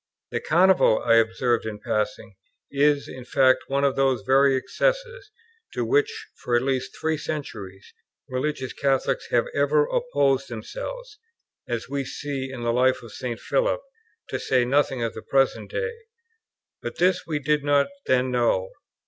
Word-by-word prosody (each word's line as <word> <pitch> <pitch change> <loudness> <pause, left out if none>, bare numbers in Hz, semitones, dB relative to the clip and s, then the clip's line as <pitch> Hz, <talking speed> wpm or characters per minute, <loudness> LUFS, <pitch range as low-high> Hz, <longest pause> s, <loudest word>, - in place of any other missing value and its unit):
'" - - -65
The - - -1
Carnival, 180 -7 +4
I 115 -1 +5
observe 115 +1 +2
in 105 -1 -5
passing, 105 +1 -2 0.4
is, 145 0 +2
in 130 -1 -9
fact, 130 0 +3
one 140 +1 0
of 140 -1 +2
those 135 -5 +1
very 135 +4 +4
excesses, - - -1 0.5
to - - -1
which, 435 +1 +1
for 120 - -1
at 120 - +2
least 130 -1 -2
three 160 -1 0
centuries, 100 -12 -6 0.3
religious 130 0 -3
Catholics 135 - 0
have - - +2
ever 465 -1 +3
opposed 485 - +1
themselves, 430 - -7 0.5
as 120 -1 -3
we 140 +1 -2
see 135 0 -5
in 125 -3 -6
the 115 0 +1
life 130 +1 +2
of 115 - -11
St. 120 -1 -5
Philip, - - 0 0.5
to - - -3
say 125 -2 +2
nothing 135 -1 +1
of 115 - -2
the - - -8
present 135 0 +1
day; 470 -1 -2 0.9
but - - -6
this 185 +1 +2
we 155 -2 -1
did 150 0 0
not 145 -1 +3 0.2
then 130 0 +2
know. 115 -6 +1
135 Hz, 160 wpm, -24 LUFS, 125-160 Hz, 0.9 s, I